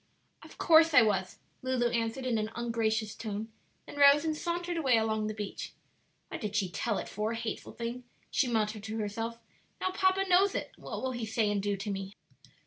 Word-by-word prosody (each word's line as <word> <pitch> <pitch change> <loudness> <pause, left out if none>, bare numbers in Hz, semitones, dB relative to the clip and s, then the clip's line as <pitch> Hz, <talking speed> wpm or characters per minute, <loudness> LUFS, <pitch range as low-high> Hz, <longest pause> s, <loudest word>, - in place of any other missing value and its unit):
"Of - - -14
course 325 -2 +6
I 250 - +9
was," 190 -4 0 0.2
Lulu 255 -2 +1
answered 230 +3 -1
in 235 -3 +1
an 215 0 -2
ungracious 220 -2 0
tone; 220 0 -5 0.4
then - - -10
rose 285 +2 +7
and 315 -1 0
sauntered 345 +2 -2
away 270 -8 +3
along 220 -1 0
the 215 - -3
beach. 210 -2 -5 0.6
"What - - -6
did 210 -1 -3
she 195 -3 +1
tell 225 +1 -1
it - - -4
for, 215 +2 -2
hateful 230 -1 -5
thing!" 235 +2 -5 0.3
she 265 - +2
muttered 215 -2 0
to 220 0 -4
herself; 225 +2 -3 0.4
"now 370 - 0
papa 380 0 +2
knows 380 +2 +4
it, - - -3
and - - -17
what - - -5
will 260 - 0
he 240 -3 -4
say 220 -1 +1
and 205 -1 0
do 200 0 -1
to 205 +2 -4
me?" 195 +1 -5
230 Hz, 205 wpm, -30 LUFS, 215-270 Hz, 0.6 s, I